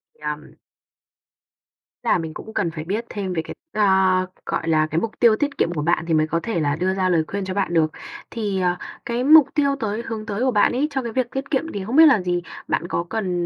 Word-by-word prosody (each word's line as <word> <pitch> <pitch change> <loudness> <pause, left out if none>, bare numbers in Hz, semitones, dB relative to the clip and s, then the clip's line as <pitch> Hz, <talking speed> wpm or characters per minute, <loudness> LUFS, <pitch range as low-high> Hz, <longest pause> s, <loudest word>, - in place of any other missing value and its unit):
Nhầm. - - -6 1.5
Là 230 - +3
mình 160 -2 -5
cũng 220 - -9
cần 165 - 0
phải 155 -1 -6
biết 210 +7 -3
thêm 190 -3 -4
về 160 - 0
cái - - -9 0.2
a, 190 -3 +3 0.2
gọi 165 - -2
là, 155 -1 +3
cái 160 - +1
mục 225 - -2
tiêu 230 -3 +6
tiết 285 +4 -2
kiệm 170 - +1
của 150 - -2
bạn 170 +1 +1
thì 165 - +1
mới 155 0 +3
có 165 +1 0
thể 225 -8 -1
là 145 -1 +1
đưa 185 +3 0
ra 185 -1 0
lời 165 -3 +3
khuyên 200 -1 -3
cho 185 - -4
bạn 195 -3 -1
được. 155 -2 +3 0.4
Thì, 205 -5 -2
ờ, 180 -1 +1 0.3
cái 240 +1 -1
mục 300 -1 +8
tiêu 280 -2 +2
tới 220 +1 -2
hướng 220 -1 -5
tới 205 0 -4
của 260 - +2
bạn 205 -2 +3
ấy, 280 +5 0
cho 265 -1 -1
cái 235 - -4
việc 250 0 -1
tiết 270 +2 -5
kiệm 310 +4 0
thì 195 -2 -4
không 240 +5 -3
biết 320 +1 +9
là 255 -10 +5
gì? 175 -1 -1 0.3
Bạn 170 - -1
có 170 - -1
cần, 180 -6 -1
195 Hz, 250 wpm, -22 LUFS, 175-235 Hz, 1.5 s, biết